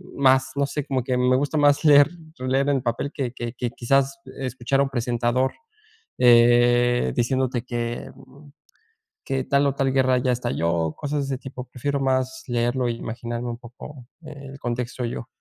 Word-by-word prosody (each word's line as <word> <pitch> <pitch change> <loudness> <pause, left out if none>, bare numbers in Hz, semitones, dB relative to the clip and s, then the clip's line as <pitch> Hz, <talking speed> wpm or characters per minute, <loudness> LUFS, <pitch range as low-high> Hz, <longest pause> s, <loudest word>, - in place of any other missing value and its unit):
más, 130 -1 +3
no 140 - +1
sé, 145 0 -4
como 130 -2 -1
que 125 +1 -1
me 125 0 +3
gusta 145 +3 -2
más 145 0 +4
leer 145 0 +7 0.3
leer 130 +2 0
el 135 -3 +1
papel 120 +4 -2
que 130 -5 -3
que 120 -2 -5
que 120 -1 -3
quizás 135 +3 +1 0.2
escuchar 130 +1 -1
a - - +5
un 140 - -2
presentador, 120 +1 0 0.7
eh, 120 0 +5
diciéndote 130 0 0
que, 120 -1 -4
mm, 140 +2 -17 0.8
que 135 -1 -1
tal 140 0 +2
o 135 - 0
tal 135 -1 0
guerra 130 -1 +3
ya 125 0 +1
estalló, 85 -10 -1
cosas 145 -1 -2
de 135 - -1
ese - - -9
tipo. 130 -1 -8
Prefiero 140 +3 -2
más 130 0 0
leerlo 120 +1 0
e - - +1
imaginarme 120 +1 -5
un 115 - -5
poco 125 +2 -12 0.2
e 155 - -9 0.2
el 135 - -11
contexto 120 0 -3
yo. 115 0 -5
130 Hz, 180 wpm, -23 LUFS, 120-135 Hz, 0.8 s, leer